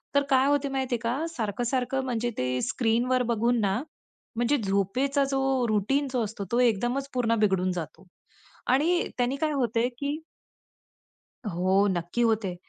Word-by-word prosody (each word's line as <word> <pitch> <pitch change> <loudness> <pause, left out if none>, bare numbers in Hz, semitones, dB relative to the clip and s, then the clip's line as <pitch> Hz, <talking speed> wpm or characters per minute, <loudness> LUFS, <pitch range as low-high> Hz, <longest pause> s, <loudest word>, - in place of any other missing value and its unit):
तर 280 - +5
काय 265 0 +4
होत 285 0 +2
माहितीये 260 -3 -1
का 235 +3 0
सारखं-सारखं 245 +1 -1
म्हणजे 240 -1 -1
ते 125 0 -1
स्क्रीनवर 250 +2 +1
बघून 235 +1 +2
ना 200 +4 +1 0.6
म्हणजे 240 +5 +2
झोपेचा 250 +9 +1
जो 270 -2 +1
रूटीन 225 +7 +1
जो 240 -3 +1
असतो 205 -1 -6
तो 240 - +2
एकदमच 245 +4 +1
पूर्ण 230 -2 +1
बिघडून 190 -3 +2
जातो. 175 +2 -7 0.6
आणि 310 +8 +2
त्यांनी 250 +2 +1
काय 310 +1 0
होतंय 240 -2 +1
की 285 +1 -2 1.3
हो. 190 +2 +2
नक्की 175 +5 -1
होते. 215 -6 +1
240 Hz, 140 wpm, -27 LUFS, 205-270 Hz, 1.3 s, तर